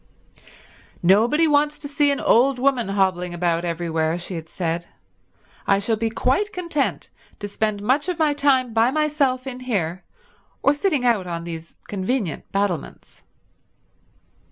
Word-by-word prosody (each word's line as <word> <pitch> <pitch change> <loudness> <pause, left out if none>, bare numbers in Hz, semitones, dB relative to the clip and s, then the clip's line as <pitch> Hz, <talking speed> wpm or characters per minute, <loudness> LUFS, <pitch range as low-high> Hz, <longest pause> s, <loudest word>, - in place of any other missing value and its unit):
"Nobody 230 - +4
wants 295 0 +2
to 290 - -6
see 285 0 +2
an 280 - 0
old 260 +3 +4
woman 255 -5 +1
hobbling 185 -3 0
about 170 -1 0
everywhere," 165 -1 -1
she 175 +2 -6
had 165 -2 -6
said. 170 -1 -3 0.8
"I 195 - +4
shall 205 +3 0
be 225 +1 -1
quite 265 - 0
content 340 -6 -2 0.3
to 205 - -5
spend 205 0 -2
much 275 - +1
of 360 - -2
my 310 -3 +2
time 270 -4 +2
by 225 +2 +4
myself 280 -3 0
in 255 -2 -6
here 190 -9 -2 0.6
or 280 - +5
sitting 290 -4 0
out 215 -7 +2
on 170 -1 -4
these 165 -1 -8
convenient 200 - -2
battlements." 195 -6 -3
225 Hz, 145 wpm, -22 LUFS, 180-280 Hz, 0.8 s, or